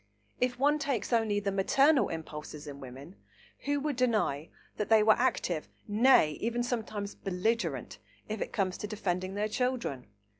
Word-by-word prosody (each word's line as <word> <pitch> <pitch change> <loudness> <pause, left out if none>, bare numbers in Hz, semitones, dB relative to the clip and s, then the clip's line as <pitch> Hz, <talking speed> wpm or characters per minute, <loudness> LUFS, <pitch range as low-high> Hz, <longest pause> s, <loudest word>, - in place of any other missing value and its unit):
If 250 -1 0
one 290 +3 +3
takes 275 -5 -2
only 220 -3 +2
the 200 -1 -1
maternal 270 +10 +3
impulses 155 -2 -7
in 140 -1 -8
women, 135 +7 -10 0.5
who 285 0 +1
would 295 -1 -1
deny 215 - 0 0.3
that 210 - -2
they 220 -1 +6
were 215 0 +7
active, 180 -10 0 0.2
nay, 215 -6 +5
even 235 +1 0
sometimes 220 -4 -3
belligerent, 180 - -2 0.3
if 215 -1 -4
it - - -3
comes 190 -3 -1
to 210 - -4
defending 190 -3 -2
their 210 +1 0
children? 235 - -2
210 Hz, 155 wpm, -30 LUFS, 180-245 Hz, 0.5 s, were